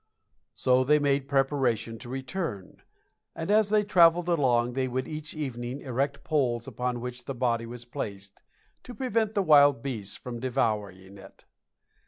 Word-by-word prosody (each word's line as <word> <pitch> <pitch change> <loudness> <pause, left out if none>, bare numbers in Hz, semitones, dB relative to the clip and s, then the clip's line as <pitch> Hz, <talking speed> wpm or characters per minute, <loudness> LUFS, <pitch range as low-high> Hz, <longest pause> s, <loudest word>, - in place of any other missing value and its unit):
So 130 0 +3
they 150 +3 +4
made 140 -2 +1
preparation 135 -5 0
to 120 - -10
return, 130 - -5 0.5
and 165 +4 -3
as 215 -1 +4
they 210 0 +3
traveled 175 -3 +4
along 125 -7 +2
they 130 0 -1
would 130 +1 -3
each 155 -1 -7
evening 130 -3 -5
erect 140 +2 -2
poles 125 -6 0
upon 125 -1 -3
which 125 0 -6
the 135 - -5
body 115 -2 0
was 120 0 -8
placed, 100 -6 -7 0.4
to 245 - -10
prevent 225 -3 -1
the 200 - +2
wild 145 -6 +5
beasts 110 -8 -3
from 120 -2 -7
devouring 105 -6 -2
it. - - -16
130 Hz, 155 wpm, -27 LUFS, 120-150 Hz, 0.5 s, wild